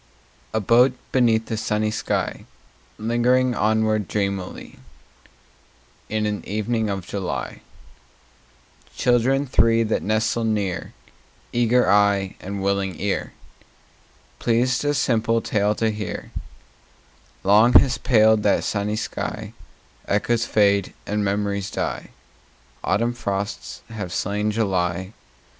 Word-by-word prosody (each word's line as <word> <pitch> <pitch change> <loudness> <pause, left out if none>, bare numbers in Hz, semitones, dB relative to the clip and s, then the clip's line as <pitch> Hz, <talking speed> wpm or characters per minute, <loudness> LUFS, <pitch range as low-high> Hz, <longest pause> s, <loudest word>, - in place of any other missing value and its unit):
A 110 - 0
boat 120 +5 +4 0.2
beneath 115 -4 +2
a 110 - -1
sunny 110 0 0
sky, - - -2 0.5
Lingering 120 +3 +2
onward 110 -2 +1
dreamily 100 -3 -4 1.3
In 110 0 -1
an 105 -1 -2
evening 110 +1 -1
of 95 -3 -3
July— 95 -3 -4 1.4
Children 130 +3 +2
three 115 -3 +3
that 110 0 -1
nestle 110 +2 0
near, 105 -5 -2 0.6
Eager 120 +1 +3
eye 100 -1 +3
and 100 +1 -5
willing 100 -1 -1
ear, 100 0 -2 1.1
Pleased 125 +3 +1
a 145 0 +1
simple 115 -3 +1
tale 105 -1 0
to 110 0 0
hear— 105 -2 -6 1.1
Long 105 +5 +5
has 125 -2 +5
paled 110 -3 +4
that 105 - +2
sunny 105 0 -1
sky: 110 - -4 0.5
Echoes 115 +3 +1
fade 100 -2 +2
and 105 0 -1
memories 100 0 -1
die. - - -4 0.7
Autumn 115 +3 +1
frosts 100 -4 -4
have 100 -6 -6
slain 105 +3 -1
July. 95 -3 -1
110 Hz, 110 wpm, -22 LUFS, 100-115 Hz, 1.4 s, Long